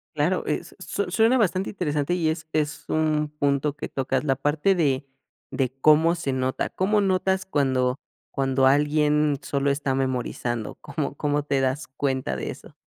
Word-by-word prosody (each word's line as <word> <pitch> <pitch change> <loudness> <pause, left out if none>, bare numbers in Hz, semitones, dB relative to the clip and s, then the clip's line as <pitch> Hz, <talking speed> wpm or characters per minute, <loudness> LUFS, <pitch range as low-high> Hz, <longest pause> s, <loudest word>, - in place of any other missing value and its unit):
Claro, - - +1
eh, - - 0 0.2
su 200 -3 -3
suena 225 +6 +4
bastante 195 -3 +1
interesante 150 -4 -1
y 170 -3 +1
es 160 0 -4
es 150 -1 -1
un 155 -1 +1
punto 140 0 +1
que 150 - -6
tocas, 135 0 -1
la 135 -3 +1
parte 150 +7 +2
de 140 -6 +1 0.5
de 130 -2 -1
cómo 160 +3 +5
se 165 -5 -2
nota, 130 0 -1
¿cómo 205 +3 +1
notas 190 0 +1
cuando 130 -5 +1 0.3
cuando 135 -1 +1
alguien 150 +1 +3
solo 140 0 0
está 140 -1 -1
memorizando? 125 -3 -2
¿Cómo 140 0 -4
cómo 145 0 0
te 140 -2 0
das 135 +3 -1
cuenta 130 - -2
de - - -4
eso? - - -12
145 Hz, 165 wpm, -25 LUFS, 135-160 Hz, 0.5 s, cómo